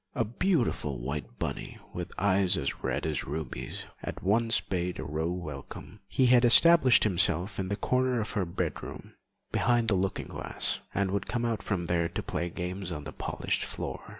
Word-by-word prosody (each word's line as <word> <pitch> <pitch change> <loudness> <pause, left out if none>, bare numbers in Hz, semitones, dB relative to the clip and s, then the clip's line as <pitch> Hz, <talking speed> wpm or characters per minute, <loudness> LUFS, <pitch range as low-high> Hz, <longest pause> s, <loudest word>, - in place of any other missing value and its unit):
A 115 - +1
beautiful 120 - 0
white 70 +5 -5
bunny, - - -4 0.2
with - - -5
eyes 95 -2 +3
as 70 - -3
red - - -1
as 80 -3 -1
rubies, 75 -2 -5 0.2
at - - -6
once 115 +4 +3
bade 90 -1 -3
Aurore 80 +4 -2
welcome. 75 +3 -8
He 130 - +2
had 125 0 +6
established 130 +1 +7
himself 95 -1 +1
in 95 - -1
the 100 - -1
corner 125 +2 +1
of 110 - -3
her 105 - 0
bedroom 85 - -5 0.4
behind 120 -1 +2
the - - +3
looking 95 +1 -1
glass, - - -2
and 100 -1 0
would 100 0 -1
come 120 -1 -1
out 115 -3 -1
from 95 -4 -2
there 85 -1 +1
to - - -4
play 85 - -2
games 90 +1 -4
on 75 -3 -5
the - - -7
polished - - -2
floor. - - -5
95 Hz, 175 wpm, -29 LUFS, 85-115 Hz, 0.4 s, established